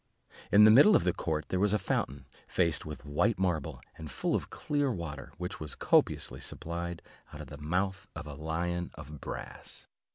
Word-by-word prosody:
In 105 +1 +8
the 110 - +9
middle 145 - +8
of - - +4
the 90 -1 +2
court 80 -2 -2
there 95 - 0
was 105 +1 +3
a - - +4
fountain, 70 -8 -2 0.2
faced 85 -3 0
with 75 0 -8
white 75 +10 +1
marble, 90 -4 -1 0.2
and 80 -1 -7
full - - -1
of - - -1
clear 145 -2 0
water, 80 -8 -6
which 90 +1 -5
was 75 -2 -6
copiously 65 - +2
supplied 85 +5 -5 0.3
out - - -8
of - - -9
the 70 - -9
mouth 95 +5 -1
of - - -6
a 75 - -7
lion 85 +3 -2
of 75 -2 -10
brass. - - -8
85 Hz, 190 wpm, -31 LUFS, 75-95 Hz, 0.3 s, the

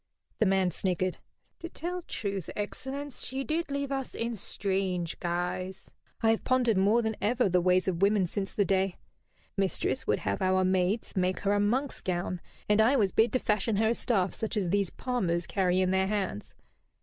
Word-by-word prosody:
The 220 - +4
man 190 -1 +2
sniggered. 185 +1 -1 0.4
"To 340 - -6
tell 355 +2 -4
truth, 200 - -4
excellence, 270 +6 -5
she 265 +1 -3
did 320 +2 -1
leave 280 0 -2
us 270 -1 -3
in 235 +1 -2
strange 190 -4 -2
guise. 180 +2 -3 0.3
I 225 - +5
have 225 - 0
pondered 250 -4 +2
more 215 +5 +4
than 220 -1 -1
ever 240 +4 +2
upon 195 - +2
the 180 0 +4
ways 185 +1 +3
of 180 -2 -1
women 200 -1 +4
since 195 +3 -3
the 205 - +1
day. 190 -1 +1 0.6
Mistress 190 -8 0
would 105 - +1
have 100 -1 -2
our 185 0 +3
maids 185 +5 0
make 185 0 0
her 200 0 +2
a 205 - +2
monk's 250 +7 0
gown, 180 -1 -2 0.3
and 210 +1 +4
I 240 +6 +4
was 205 -7 +3
bid 225 0 +3
to 255 - +3
fashion 210 0 +1
her 220 +2 +3
a - - +3
staff 195 -6 +1
such 220 0 -3
as 190 -4 0
these 200 -1 +1
palmers 180 -9 -1
carry 185 -1 +1
in 185 0 +2
their 190 0 +2
hands. 195 - -3
200 Hz, 195 wpm, -29 LUFS, 185-230 Hz, 0.6 s, I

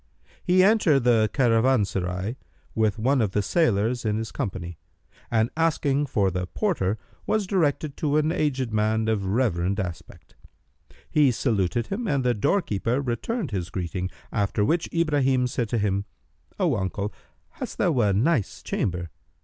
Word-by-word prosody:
He 185 0 +4
entered 190 -9 +4
the 115 -3 +4
caravanserai, 110 -6 +1 0.4
with 110 -2 +1
one 130 +4 +2
of 100 -4 0
the 105 - +1
sailors 120 - +1
in 105 -1 0
his 110 0 -4
company; 90 - -5 0.5
and, 110 0 +1
asking 145 -3 +1
for 100 -6 +1
the 90 0 -3
porter, 110 - -1 0.3
was 215 -2 +1
directed 155 -6 0
to 150 -1 +1
an 155 +1 +2
aged 130 -8 -1
man 110 +1 +1
of 105 -3 0
reverend 100 -3 0
aspect. 90 -4 -7 0.7
He 150 -3 +4
saluted 115 -2 0
him 230 +3 -3
and 140 -7 +1
the 125 -1 +2
doorkeeper 115 - 0
returned 140 - -2
his 90 -4 -3
greeting; 90 0 -3 0.2
after 105 0 0
which 165 +7 0
Ibrahim 140 -6 +2
said 120 -2 -2
to 120 - 0
him, 100 -1 0 0.5
"O - - +2
uncle, 100 +2 -3 0.4
hast - - -7
thou 155 -8 +2
a 105 -4 +3
nice 115 - 0
chamber?" 85 -3 -2
115 Hz, 150 wpm, -25 LUFS, 100-145 Hz, 0.7 s, He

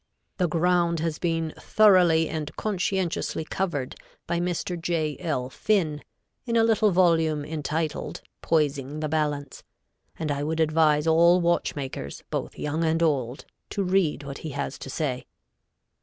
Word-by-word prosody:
The 180 -3 +2
ground 170 0 +2
has 165 -1 -2
been 165 -2 -1
thoroughly 180 -6 +5
and 155 -2 -5
conscientiously 190 -5 -1
covered 155 -8 -2 0.3
by 170 - -1
Mr. 175 0 -2
J. 160 -3 -1
L. 130 -6 -2
Finn, 155 0 0 0.4
in 235 - 0
a 225 - +5
little 220 -1 +3
volume 165 -5 +2
entitled 155 0 -3 0.2
Poising 150 -2 0
the 155 - -1
Balance,[A] 145 -2 -2 0.6
and 155 -2 -2
I 140 0 -2
would 160 +2 -2
advise 155 -1 +3
all 170 +2 +5
watchmakers, 140 - -2
both - - -4
young 155 +3 -2
and 165 +1 +2
old, 135 -5 0 0.2
to 200 - -1
read 180 -6 +1
what 140 0 -7
he 160 - -6
has 140 -1 -3
to - - -8
say. 130 -3 -3
160 Hz, 140 wpm, -26 LUFS, 150-175 Hz, 0.6 s, thoroughly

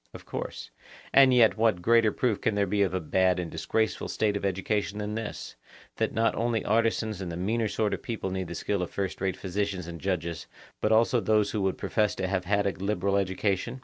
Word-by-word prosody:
Of - - -11
course. - - -6 0.4
And 135 -1 +7
yet 115 -5 +5
what 110 -6 +2
greater 115 0 +4
proof 110 -4 0
can 110 - +1
there 100 -1 +2
be 100 +2 0
of 95 -2 +1
a - - +1
bad 90 +3 +2
and 90 -2 -4
disgraceful 110 +7 -1
state 105 -2 0
of 100 - -3
education 100 +2 -1
than 105 0 -3
this, 110 -1 -5 0.4
that - - 0
not 115 +1 +1
only 115 -1 -1
artisans 110 -2 +1
and 90 -2 -4
the 85 - -5
meaner 110 +5 0
sort 105 0 -1
of - - -3
people 110 -5 -4
need 95 -1 -3
the 85 - -6
skill 100 +3 -1
of 90 - -3
first 95 -2 -4
rate 95 -1 -1
physicians 95 -1 -2
and 85 -1 -8
judges, 85 -3 -2 0.3
but 105 - +1
also 115 +3 +4
those 105 -2 +2
who 105 - -1
would 95 -1 0
profess 105 -2 0
to - - -2
have 95 -1 -1
had 100 +2 +1
a 100 - +2
liberal 100 0 -1
education? 100 +5 -1
100 Hz, 220 wpm, -28 LUFS, 95-110 Hz, 0.4 s, And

